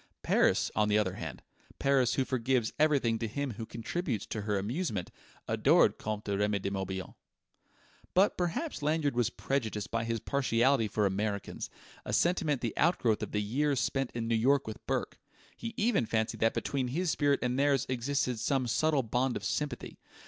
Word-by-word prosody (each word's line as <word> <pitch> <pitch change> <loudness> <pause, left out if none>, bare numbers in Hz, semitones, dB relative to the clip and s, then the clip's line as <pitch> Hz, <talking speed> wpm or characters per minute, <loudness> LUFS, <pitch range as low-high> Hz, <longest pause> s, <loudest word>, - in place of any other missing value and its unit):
Paris, - - +3
on 105 0 +2
the 105 - +4
other 100 -4 +1
hand 80 -8 -7 0.3
Paris 135 -3 +2
who 135 - +1
forgives 125 -2 0
everything 140 -7 +3
to 115 - -2
him 140 +5 -3
who 110 0 -7
contributes 120 - -3
to 110 - -4
her 105 0 -1
amusement 105 - -2 0.4
adored - - +4
Comte 105 0 -4
Remy 105 +1 +1
de 100 0 -3
Morbihan... 95 -1 -4 1.0
But 190 +3 +4
perhaps 180 - -2
Lanyard 150 -2 +1
was 120 -3 +2
prejudiced 110 -6 -2
by 115 0 0
his 115 0 -1
partiality 130 -2 +2
for 105 0 0
Americans, 100 +1 -2 0.3
a - - -5
sentiment 165 -6 +2
the 115 -3 -2
outgrowth 125 -9 +2
of - - -4
the 105 0 0
years 140 +5 +1
spent 135 0 0
in 115 -1 -2
New 115 - +1
York 135 +5 +3
with 110 - -7
Bourke. - - -2 0.4
He 115 - -6
even 210 - +2
fancied 110 0 -1
that 115 0 +2
between 135 -3 -1
his 165 +7 0
spirit 145 -2 +2
and 125 +1 0
theirs 140 -3 +3
existed 130 -1 -1
some 130 +3 +1
subtle 145 +3 +2
bond 125 +2 0
of - - -9
sympathy. 150 -1 -3
120 Hz, 175 wpm, -31 LUFS, 110-140 Hz, 1.0 s, the